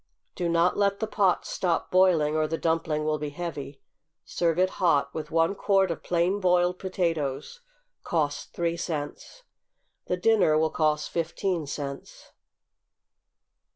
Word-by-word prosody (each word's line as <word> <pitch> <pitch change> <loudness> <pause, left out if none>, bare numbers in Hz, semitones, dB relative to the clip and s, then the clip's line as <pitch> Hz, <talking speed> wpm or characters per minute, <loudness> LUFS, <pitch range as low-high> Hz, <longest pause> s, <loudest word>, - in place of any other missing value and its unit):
Do 175 -2 -2
not 170 +1 +2
let 200 -1 +1
the 220 - 0
pot 200 -4 +1
stop 175 -3 -1
boiling, 175 -5 +4
or 155 0 +1
the 165 +1 -2
dumpling 160 -2 -1
will 155 0 0
be 150 0 -3
heavy. 145 -3 -6 0.5
Serve 170 -2 0
it 185 +1 +3
hot, 145 -6 +2
with 155 -1 -5
one 165 +3 +2
quart 195 -2 +2
of 165 - -5
plain 175 +3 0
boiled 180 -1 +2
potatoes, 165 - -2 0.4
(cost 150 -4 -2
three 170 0 -1
cents.) 165 - -5 0.6
The 180 - 0
dinner 185 -6 +3
will 160 0 +1
cost 150 -1 0
fifteen 170 0 -2
cents. 140 -1 -7
170 Hz, 140 wpm, -26 LUFS, 155-180 Hz, 0.6 s, boiling